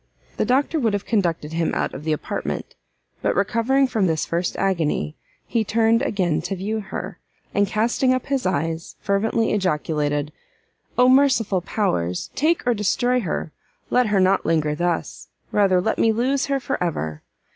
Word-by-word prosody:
The - - +1
doctor 285 +5 +1
would 225 -6 +1
have 205 -1 -2
conducted 170 -8 0
him 165 0 0
out - - -1
of 145 - -7
the 160 - 0
apartment; 155 - -3 0.5
but, - - +1
recovering 230 +7 +2
from 220 -7 +1
this 160 -2 0
first 170 +1 -2
agony, 160 - 0 0.3
he 230 - 0
turned 225 +2 +2
again 185 - 0
to 195 - -3
view 210 +4 -2
her, 195 -3 -6 0.3
and 205 0 +2
casting 235 +5 +1
up 255 -1 0
his 275 -2 -1
eyes, 165 -1 -2
fervently 220 +3 +1
ejaculated, 150 -6 0 0.7
"Oh 250 0 +6
merciful 255 -8 +4
powers! 90 - -1
Take, 320 +2 +1
or 245 - +3
destroy 245 +4 +1
her! 170 -6 -3 0.4
let 250 -1 +3
her 205 -2 +2
not 190 +1 +3
linger 155 -2 +1
thus, 175 +2 -2 0.2
rather 195 -3 +3
let 205 +5 -1
me 225 - +4
lose 260 +5 0
her 275 -1 0
for 250 - -2
ever! 80 - -3
200 Hz, 165 wpm, -22 LUFS, 165-235 Hz, 0.7 s, Oh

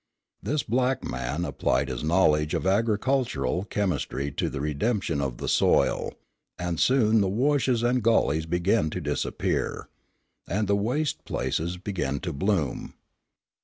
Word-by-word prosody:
This 150 0 -1
black 130 +3 0
man 75 +7 -3
applied 70 -2 0
his 65 -1 -4
knowledge 75 -2 +3
of - - -2
agricultural 110 0 +1
chemistry 80 -8 -2
to - - -1
the 70 - -5
redemption 75 - -1
of 65 -3 -3
the - - -5
soil; - - +2 0.4
and 90 -2 -3
soon 115 -4 +4
the 95 - +1
washes 130 +1 +1
and 125 +1 +2
gulleys 80 -9 +2
began 90 +1 +1
to - - -4
disappear, - - -2 0.6
and 105 +3 0
the 100 - +3
waste 125 +9 -1
places 85 +3 -2
began 90 -8 -3
to 85 - -3
bloom. 80 -3 -1
95 Hz, 135 wpm, -26 LUFS, 75-115 Hz, 0.6 s, soon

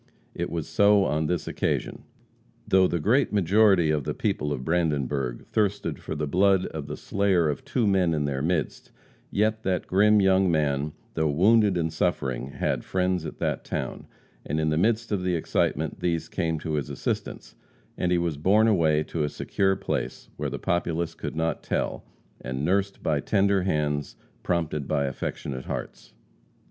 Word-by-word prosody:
It 85 - -3
was 80 -3 -3
so 100 -1 +4
on 75 0 0
this 90 -1 -2
occasion. - - -2 0.6
Though 95 -1 +5
the 85 - -1
great 120 - +2
majority 100 -3 +4
of 75 -2 0
the - - -3
people 75 - -1
of 65 -3 -3
Brandenburg 70 -7 -1
thirsted 105 -2 0
for - - -5
the 75 0 -2
blood 95 +4 +3
of 75 -3 -6
the - - -5
slayer 95 -5 +1
of 75 - -3
two 120 - 0
men 95 -5 +2
in 75 -1 0
their 70 -2 -2
midst, 80 -1 -2 0.4
yet 110 +2 +1
that 95 -4 -1
grim 105 +3 +4
young 95 -1 +4
man, 75 -2 0 0.2
though 80 -1 +1
wounded 100 +5 +4
and 80 -2 -1
suffering, 65 -7 -1
had 70 - -2
friends 90 -3 -1
at - - -8
that - - -2
town, - - -5 0.4
and 75 +2 -2
in 80 0 +1
the - - +1
midst 110 +5 +1
of 100 -3 0
the 90 -1 0
excitement, 80 - -1
these 85 -2 -1
came 80 -1 -1
to 80 - -3
his 75 -3 -2
assistance, - - -4 0.4
and 90 - -1
he 90 - +3
was 85 -4 -1
borne 105 +8 +4
away 80 -7 +3
to 80 - -4
a 75 - 0
secure 95 +6 0
place, - - -4
where - - -3
the - - -4
populace 85 -1 -1
could - - -6
not 80 +1 -1
tell, - - -2 0.4
and 65 +3 -3
nursed 100 +3 0
by 75 -2 +1
tender 100 +2 +2
hands 75 -5 -1 0.3
prompted 80 -5 -1
by 70 - +1
affectionate 65 0 -4
hearts. - - -7
85 Hz, 175 wpm, -26 LUFS, 75-95 Hz, 0.6 s, Though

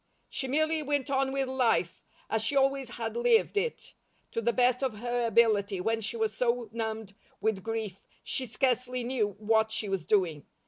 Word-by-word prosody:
She 265 - -3
merely 315 +3 +1
went 285 -1 -1
on 270 0 +1
with 270 -1 0
life, 250 -9 +1 0.3
as 220 0 0
she 250 +6 0
always 270 -2 +2
had 230 -2 -5
lived 240 - +3
it, 455 +3 -2 0.4
to 230 - -2
the 235 +1 +2
best 250 +1 +2
of 260 -5 -1
her 240 +1 -1
ability 210 -3 +3
when 225 +4 0
she 220 +2 -3
was 220 -1 0
so 240 -1 0
numbed 220 -2 -4 0.3
with 220 -3 0
grief 220 -3 -4 0.2
she 260 - -2
scarcely 250 +2 0
knew 230 -5 -1
what 220 +1 +2
she 215 -1 -1
was 190 -4 -2
doing. 175 -8 +1
230 Hz, 180 wpm, -29 LUFS, 220-260 Hz, 0.4 s, lived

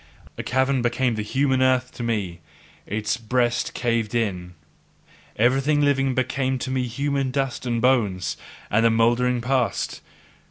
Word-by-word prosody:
A - - -4
cavern, 130 0 +1
became 120 +1 +1
the 110 - -2
human 130 +4 +1
earth 130 -1 +2
to - - -9
me; 105 -7 -2 0.5
its 105 +2 -1
breast 120 +1 0
caved 115 -2 -1
in; 90 -6 -2 0.8
everything 135 +6 +2
living 135 -2 +2
became 130 +1 0
to 130 - -4
me 130 -1 -1
human 140 +2 -1
dust 130 -1 -2
and 120 -1 0
bones 110 -8 +1 0.4
and 115 +2 +3
mouldering 120 +2 +2
past. 125 -3 -1
125 Hz, 135 wpm, -23 LUFS, 115-130 Hz, 0.8 s, and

